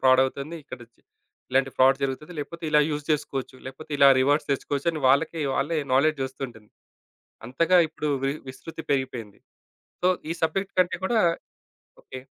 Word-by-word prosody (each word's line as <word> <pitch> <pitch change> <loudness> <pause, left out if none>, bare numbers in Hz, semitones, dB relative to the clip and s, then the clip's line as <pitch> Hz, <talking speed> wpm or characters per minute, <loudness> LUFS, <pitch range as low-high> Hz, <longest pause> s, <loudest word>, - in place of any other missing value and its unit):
Fraud 130 0 +5
అవుతుంది. 140 +5 -5
ఇక్కడ 130 - -9 0.7
ఇలాంటి 135 +1 +2
ఫ్రాడ్ 130 +1 +5
జరుగుతుంది. 140 +5 -3
లేపోతే 170 +3 -8
ఇలా 150 -1 +5
యూజ్ 150 -1 -3
చేసుకోవచ్చు, 135 -3 -3
లేపోతే 145 +4 -10
ఇలా 140 - +8
రివార్డ్స్ 145 +3 +2
తెచ్చుకోవచ్చు 140 +2 -1
అని 155 - -5
వాళ్ళకి 160 +4 +2
వాళ్ళే 155 +4 0 0.2
నాలెడ్జ్ 145 +2 +3
వస్తుంటుంది. 120 -5 -9 0.8
అంతగా 165 +8 +2
ఇప్పుడు 155 -1 -4 0.2
వి 135 - +2 0.2
విస్తృతి 160 +5 -8
పెరిగిపోయింది. 130 -7 -2 0.6
సో, 180 - +3 0.2
ఈ - - +2
సబ్జెక్ట్ 195 +4 -1
కంటే 180 - +1
కూడా 230 0 +2 0.8
ఓకే. 130 - -9
140 Hz, 145 wpm, -25 LUFS, 130-155 Hz, 0.8 s, ఇలా